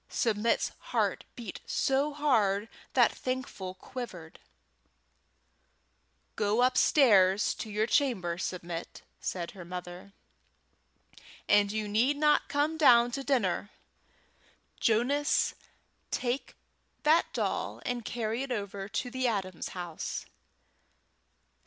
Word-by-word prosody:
Submit's 225 -1 +1
heart - - -1
beat 230 -6 -7
so 275 +2 +1
hard 225 -8 +1 0.2
that - - +5
Thankful 255 -8 -4
quivered. 185 -7 -8 2.0
"Go 215 +3 +2
upstairs 210 -7 +4
to 220 - -5
your 210 +1 +1
chamber, 210 - +1
Submit," 175 -2 -5 0.2
said 175 -2 -4
her 185 - -10
mother, 180 +2 -8 1.3
"and 205 -1 +4
you 215 0 -2
need 240 +8 +2
not 300 0 +3
come 295 +3 +1
down 240 -6 +6
to 275 +3 -3
dinner. 210 -8 0 1.1
Jonas, 255 +6 +2 0.6
take 250 +2 -2 0.5
that 315 +3 +4
doll - - -2
and 245 -1 -2
carry 225 +1 -2
it 270 -1 -4
over 200 -3 -4
to 245 +2 -3
the 260 0 0
Adams' 190 -6 -2
house." 175 -3 -5
225 Hz, 100 wpm, -30 LUFS, 195-260 Hz, 2.0 s, down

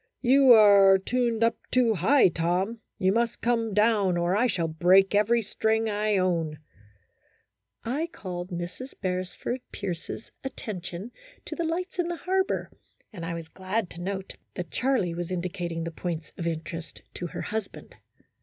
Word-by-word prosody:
" - - -56
You 275 -2 +7
are 200 -3 +7
tuned 235 +2 0
up 230 - +2
too 245 -3 +3
high, 215 +5 +4
Tom; 180 +7 -1 0.2
you 190 0 +2
must 230 +2 0
come 230 -2 0
down, 210 -3 +3
or 175 +2 +1
I 240 +5 +3
shall 175 -7 0
break 180 +5 +4
every 225 +3 +3
string 220 +2 0
I 210 0 +1
own." 165 -4 0 1.3
I 285 +8 -1
called 180 -2 -6
Mrs. 180 +9 -6
Beresford 185 +6 -3
Pierce's 185 +2 -6
attention 205 -5 -6 0.3
to - - -5
the 340 - -2
lights 360 +3 -3
in 350 - +1
the 345 - -2
harbor, 380 +2 -1 0.4
and 175 -5 -7
I 170 0 -3
was 165 -1 -7
glad 190 +3 -3
to 170 - -8
note 190 +1 -5 0.2
that 175 -4 -5
Charlie 250 -10 +1
was 175 0 -4
indicating 175 -2 -3
the 170 - -4
points 165 -1 -5
of 170 - -4
interest 165 0 -5
to 175 - -5
her - - -6
husband. 220 -2 -5
195 Hz, 160 wpm, -27 LUFS, 175-230 Hz, 1.3 s, You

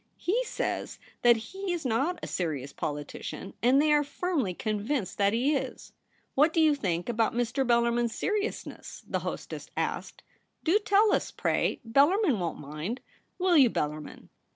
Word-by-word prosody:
/le 455 +8 +1
says - - -3 0.2
that 240 -1 +6
he 380 - -5
is 340 -4 -3
not 270 +9 +1
a - - -3
serious 145 -6 -3
politician, 150 +6 -5
and 255 +4 +5
they 300 +1 +4
are 295 0 +4
firmly 290 - -1
convinced 210 +2 -2
that 200 0 +4
he 255 +7 +2
is.' 275 - -5 0.2
' - - -39
What 300 +4 +4
do 330 - +2
you 310 -2 +5
think 180 -11 -2
about 230 -1 +1
^Ir. 245 +2 0
Bellarmin's 235 -1 +2
seriousness 420 +1 -3
?' - - -28
the - - -1
hostess - - -6
asked. - - -3 0.4
• - - -44
Do 355 +6 +4
tell 420 0 +4
us, - - +1
pray; - - 0
Bellarmin 285 - +4
won't 170 -2 -2
mind. 155 - -5 0.4
Will 365 -1 +3
you, 270 -6 +7
Bel 150 - 0
larmin 150 0 -10
245 Hz, 175 wpm, -28 LUFS, 205-320 Hz, 0.4 s, you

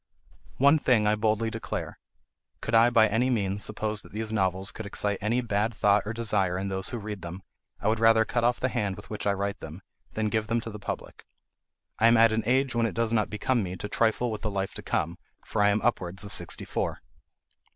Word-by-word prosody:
One 140 +4 +5
thing 120 -6 +3
I 105 - +4
boldly 110 +1 0
declare: 115 - -5 0.6
could 110 - -5
I 115 +1 +6
by 115 -2 +5
any 115 +5 +1
means 100 -4 0
suppose 110 0 -2
that - - -15
these 110 +1 -4
novels 95 -2 0
could 110 - -7
excite 100 0 -1
any 115 +5 +1
bad 110 -1 -1
thought 105 -1 +4
or - - -1
desire 95 -6 0
in 100 +1 -3
those 95 0 -2
who 120 - -4
read 105 -3 -6
them, 85 +2 -7 0.4
I - - -2
would 110 0 +2
rather 115 0 +5
cut 120 +1 -1
off 120 +1 +2
the 130 - 0
hand 105 -7 -1
with 100 - -12
which 105 - -3
I 100 - +3
write 100 0 -3
them, 80 +5 -9 0.3
than 110 -1 0
give 110 0 -1
them 115 +1 +1
to 115 - -7
the 105 - -8
public. - - -6 0.8
I 115 - +6
am 115 0 +6
at 115 0 +6
an 110 +1 +1
age 130 +1 +2
when 115 -1 +2
it - - -6
does 115 0 +1
not 105 -2 +2
become 115 +3 0
me 90 -2 -4
to 105 - -5
trifle 115 +3 +1
with 110 - -5
the 110 - -1
life 95 -1 -3
to - - -6
come, 85 +2 -2 0.3
for 110 - -1
I 105 - +5
am 105 +1 +1
upwards 95 -5 -1
of 100 - -5
sixty - - -3
four. - - -3
110 Hz, 235 wpm, -27 LUFS, 100-115 Hz, 0.8 s, I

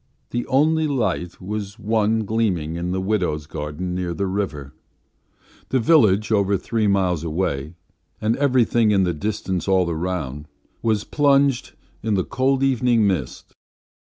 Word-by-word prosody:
The 120 0 -2
only 155 +4 +2
light 90 - -2
was 100 +2 -5
one 110 0 +1
gleaming 95 -8 -1
in 85 +1 -3
the 95 +1 -1
widows' 90 -7 -1
gardens 75 +4 -5
near 90 -2 -3
the 100 - -1
river; 85 -8 -3 1.0
the 130 - +2
village, 110 - +4
over 100 -2 +2
three 110 +3 -1
miles 95 -5 +1
away, 80 -2 -2 0.4
and 110 +2 +1
everything 125 -5 +3
in 100 -2 +3
the 90 -1 0
distance 95 +1 -3
all 95 -3 +2
round 80 -4 -4 0.3
was 110 -2 +1
plunged 140 -3 +2 0.3
in 110 -1 0
the 95 - 0
cold 135 +1 +1
evening 125 -4 +3
mist. 90 -11 -2
100 Hz, 140 wpm, -22 LUFS, 90-115 Hz, 1.0 s, village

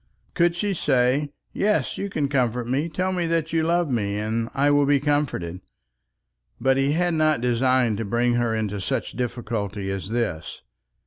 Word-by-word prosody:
Could 170 -1 +2
she 200 +3 -1
say, 135 -2 +1 0.2
"Yes, 210 +1 +1
you 200 - -3
can 150 -7 -1
comfort 125 -3 0
me. 140 +6 0
Tell 185 +3 -1
me 175 -2 -1
that 165 -1 -1
you 165 - +3
yet 160 - 0
love 170 -3 +1
me, 100 -4 -1
and 110 +2 -2
I 140 +1 +3
will 145 -1 +3
be 145 -1 +4
comforted?" 135 - -1 1.0
But 135 0 +3
he 135 +1 +2
had 175 +1 +1
not 155 -2 +2
designed 125 -2 +2
to - - -1
bring 120 +4 +1
her 120 -2 +1
into 105 -2 -2
such - - -2
difficulty 110 -5 -3
as 95 -1 -4
this. 110 -9 -3
130 Hz, 180 wpm, -24 LUFS, 115-155 Hz, 1.0 s, be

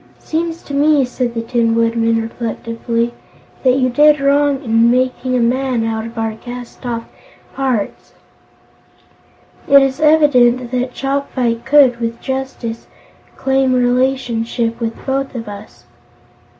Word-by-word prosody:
"It - - -29
seems 330 +1 -3
to 285 - -9
me," 290 -1 +3
said 250 -1 -3
the 230 - -2
Tin 230 -1 +1
Woodman 230 0 +1
reflectively, 230 +1 -3 0.5
"that 255 -1 +3
you 255 -1 +1
did 295 +3 +5
wrong 280 0 +2
in 230 -1 +3
making 255 +1 0
a - - +2
man 250 0 0
out 225 0 -2
of 230 +1 -12
our 225 -1 -1
cast 245 +1 -9
off 230 -1 -3 0.5
parts. 255 -6 -3 1.5
It 280 0 +7
is 270 +1 -1
evident 255 -6 +4
that 250 0 -2
Chopfyt 265 -4 -2
could, 265 -3 +5
with 230 0 -3
justice, 265 -4 -5 0.5
claim 265 -1 +1
relationship 245 -2 0
with 230 -1 -5
both 270 0 -2
of 230 -2 -5
us." 200 -13 -11
250 Hz, 135 wpm, -17 LUFS, 230-270 Hz, 1.5 s, It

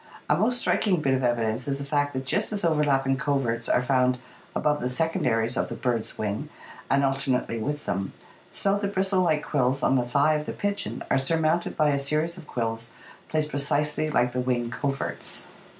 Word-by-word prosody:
A - - +4
most 245 +3 +2
striking 200 -6 +2
bit 135 -3 +1
of 130 0 0
evidence 120 0 0
is 140 -1 0
the 140 - -4
fact 145 -1 0
that 130 0 -3
just 205 +13 0
as 205 -4 -2
overlapping 140 -4 +2
coverts 125 -4 -1
are 125 - +3
found 125 -1 +2 0.4
above 150 0 +1
the 125 - -1
secondaries 125 -5 0
of - - -1
the - - -4
bird's 120 -4 -2
wing 110 +8 -3 0.4
and 140 +1 +3
alternately 135 -4 0
with 145 +5 -3
them, 95 +2 -2 0.4
so 200 0 0
the 200 - -1
bristle 190 -1 +1
like 155 -4 +2
quills 135 -1 +1
on 135 - +4
the 125 - +2
thigh 145 +4 +3
of 150 0 -2
the - - -3
pigeon 205 -1 -3
are - - +4
surmounted 160 +4 +1
by 155 -1 +4
a 140 -1 +1
scries 155 +4 0
of 175 -5 -11
quills 115 -1 -3 0.4
placed 155 -1 0
precisely 150 +2 +1
like 125 -4 +2
the 125 - 0
wing 120 -2 -1
coverts. 135 +2 -2
140 Hz, 195 wpm, -26 LUFS, 125-155 Hz, 0.4 s, A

